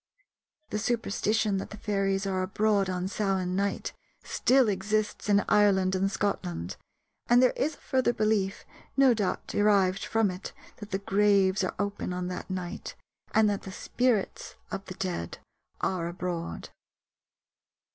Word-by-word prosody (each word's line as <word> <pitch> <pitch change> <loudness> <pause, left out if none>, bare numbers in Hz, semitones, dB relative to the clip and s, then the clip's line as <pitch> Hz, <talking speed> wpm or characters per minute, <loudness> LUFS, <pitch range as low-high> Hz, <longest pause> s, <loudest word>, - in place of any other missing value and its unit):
The 210 - -1
superstition 215 -2 0
that 190 - -4
the 210 - -9
fairies 195 -2 0
are 190 -1 0
abroad 200 +1 +1
on 180 0 -2
Samain 190 -2 -1
night 200 +1 -1 0.3
still 260 -1 +3
exists 210 +2 -1
in 205 0 +4
Ireland 190 -3 +4
and 190 +1 +1
Scotland, 90 - -2 0.5
and 240 +1 +7
there 255 0 +5
is 310 +4 0
a - - -23
further 260 -3 +1
belief, 215 -4 0 0.3
no 270 -2 +6
doubt 210 -4 -1
derived 200 -2 +2
from 225 -3 +1
it, 180 +1 -8 0.2
that 210 -2 -9
the 195 - 0
graves 195 -1 +3
are 185 - -2
open 200 -2 -2
on 180 0 -3
that 180 +1 -6
night 185 +1 -5 0.4
and 220 -1 +4
that 205 -1 0
the 190 - -8
spirits 240 +1 -1 0.2
of 195 0 -4
the 185 - -8
dead 175 - -3 0.4
are 180 -3 0
abroad. 175 -1 -4
195 Hz, 145 wpm, -28 LUFS, 185-210 Hz, 0.5 s, and